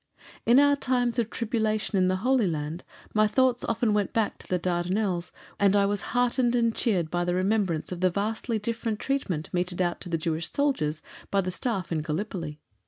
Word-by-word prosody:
In 235 +2 +6
our 285 0 +5
times 245 -3 0
of 230 -2 0
tribulation 220 -2 -1
in 185 -1 +3
the 185 - +2
Holy 255 -5 +3
Land, 155 +1 -3 0.3
my 215 0 +4
thoughts 250 +3 +2
often 230 -1 +1
went 205 -2 0
back 220 -2 0
to - - -12
the 180 - +1
Dardanelles, 180 +1 -1 0.3
and 200 0 +4
I 200 -1 +4
was 205 0 0 0.2
heartened 245 0 +2
and 230 -2 +2
cheered 180 -9 +1
by 175 0 0
the 175 0 0
remembrance 185 -4 0
of 180 - -4
the 185 - +4
vastly 220 +5 -1
different 225 0 -2
treatment 205 - -2
meted 180 0 -1
out 175 -1 0
to 180 - -6
the 165 - 0
Jewish 160 0 -2
soldiers 160 - 0 0.3
by 200 - +2
the 185 -1 -3
Staff 195 -3 -3
in 160 -2 0
Gallipoli. 160 -1 -4
200 Hz, 195 wpm, -27 LUFS, 175-230 Hz, 0.3 s, In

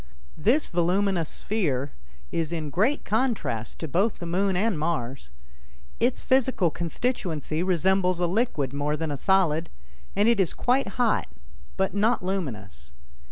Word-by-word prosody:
This 240 - +3
voluminous 175 0 +1
sphere 145 - -1 0.4
is 165 -1 -1
in 155 -4 -3
great 220 - +1
contrast 215 - -1
to 160 - -5
both 195 - +1
the 175 - -7
Moon 185 +2 +1
and 200 -4 +1
Mars. 135 - -2 0.7
Its 240 +2 +1
physical 255 -9 +2
constituency 170 - -2
resembles 185 0 +2
a 175 - +2
liquid 170 - 0
more 145 +1 -1
than 160 -1 -3
a - - -1
solid, 170 0 +2 0.5
and 205 +2 +3
it 235 -3 +4
is 185 -4 +2
quite 250 -5 0
hot 240 -3 +2 0.5
but 190 - 0
not 210 0 +1
luminous. 105 - -4
180 Hz, 140 wpm, -26 LUFS, 155-210 Hz, 0.7 s, it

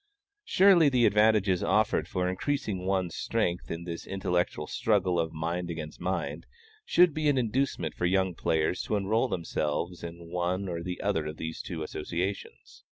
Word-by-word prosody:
Surely 185 -5 +6
the 125 -3 +3
advantages 105 -3 +3
offered - - +2
for 90 0 -1
increasing 95 -1 -2
one's 95 -3 0
strength 90 -6 -1
in 85 +1 -4
this 85 -1 -6
intellectual 95 -2 -1
struggle 95 -5 +1
of 80 -1 -1
mind 85 +2 -3
against 80 -2 -6
mind, - - -3 0.4
should 175 - +4
be 155 0 +1
an 140 - +2
inducement 120 - 0
for 90 - 0
young 95 0 +2
players 80 +1 0
to - - -2
enroll 105 +5 +1
themselves 85 -2 -2
in 85 0 -8
one 90 +2 -1
or 85 -2 -3
the 90 +1 -5
other 90 -7 0
of 75 +1 -6
these 80 0 -5
two 80 -4 -5
associations. 90 +6 -5
90 Hz, 160 wpm, -29 LUFS, 85-105 Hz, 0.4 s, Surely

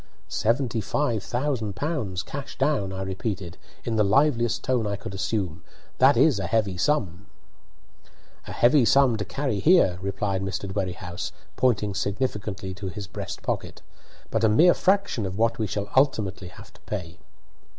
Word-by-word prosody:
"Seventy 115 0 0
five 120 -3 0
thousand 120 -4 -2
pounds, 110 - -2
cash 140 0 -7
down," 135 -8 +1
I 95 0 -4
repeated, 95 -2 -4 0.2
in 115 -2 -2
the 105 - +4
liveliest 120 +1 +2
tone 125 -4 +1
I 100 - -1
could 100 -1 -8
assume. 95 -3 -2 0.4
"That 135 +2 +6
is 145 -10 +4
a 95 - -2
heavy 105 -2 +1
sum." 100 - -1 1.2
"A - - -6
heavy 125 +3 +4
sum 130 +1 +4
to 105 - -2
carry 135 -3 -2
here," 150 - +4
replied 100 0 -2
Mr. 95 +1 -3
Dwerrihouse, 95 -3 -4 0.2
pointing 105 -5 +1
significantly 100 -2 -3
to 95 +1 -6
his 100 +2 -5
breastpocket, 90 - -5 0.5
"but 115 0 0
a 110 - +5
mere 165 +12 +6
fraction 190 - +1
of 95 +1 -6
what 115 +1 +1
we 110 - 0
shall 100 0 -3
ultimately 110 -9 +1
have 90 - -13
to - - -21
pay." 90 -4 -5
105 Hz, 155 wpm, -25 LUFS, 95-130 Hz, 1.2 s, That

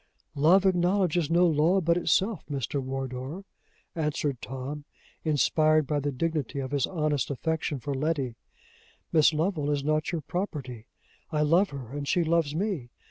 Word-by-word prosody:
"Love 165 +7 +4
acknowledges 180 -3 +2
no 175 +2 +4
law 165 +3 +3
but 170 -1 +2
itself, 190 +3 +1
Mr. 140 0 -2
Wardour," 135 +6 -5 0.5
answered 150 -5 -2
Tom, 135 +3 -6 0.4
inspired 155 +1 +3
by 145 +1 0
the 145 0 -1
dignity 150 -1 -2
of 135 -1 -3
his 140 -3 +1
honest 150 -5 -1
affection 150 0 -2
for 140 +3 -3
Letty. 135 -3 -1 0.8
"Miss 155 -1 +6
Lovel 155 -1 -1
is 145 -1 0
not 155 +2 0
your 170 -3 -2
property. 135 - -5 0.4
I 150 -2 0
love 170 +6 +4
her, 135 -5 -8
and 145 0 -5
she 175 - +2
loves 160 -2 +1
me. 175 - -2
150 Hz, 150 wpm, -27 LUFS, 140-170 Hz, 0.8 s, Miss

